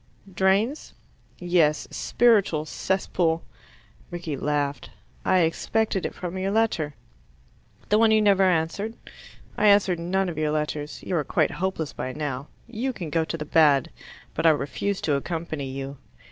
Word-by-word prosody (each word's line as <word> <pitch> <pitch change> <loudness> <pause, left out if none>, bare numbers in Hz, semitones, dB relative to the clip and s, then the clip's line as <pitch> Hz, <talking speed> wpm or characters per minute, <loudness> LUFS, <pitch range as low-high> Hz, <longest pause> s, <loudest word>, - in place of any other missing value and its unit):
"Drains?" 195 - +1 0.4
"Yes. 175 -4 +2
A - - -19
spiritual 200 -10 +2
cesspool." 170 -1 -1 0.7
Rickie 175 -4 -4
laughed. 145 0 -2 0.3
"I 185 - +3
expected 190 +4 0
it - - -11
from 180 +1 -5
your 190 +1 -1
letter." 195 -9 0 0.9
"The 210 - +4
one 225 0 +5
you 220 0 +5
never 200 -2 +4
answered?" 185 +5 +1 0.6
"I 210 - +4
answer 200 -3 +5
none 185 +3 -1
of 165 -3 -4
your 155 -1 +1
letters. 150 0 -3
You 180 - -1
are 150 - +1
quite - - +1
hopeless 180 -4 -3
by 130 - -4
now. 145 -2 -4 0.2
You 245 +3 -3
can 170 -9 -6
go 165 0 +2
to 165 +1 -4
the 150 - -5
bad. 150 -4 +4 0.4
But 165 - +2
I - - +9
refuse 160 +6 -1
to 150 - 0
accompany 155 -1 -3
you. 135 +1 -6
170 Hz, 155 wpm, -25 LUFS, 150-195 Hz, 0.9 s, I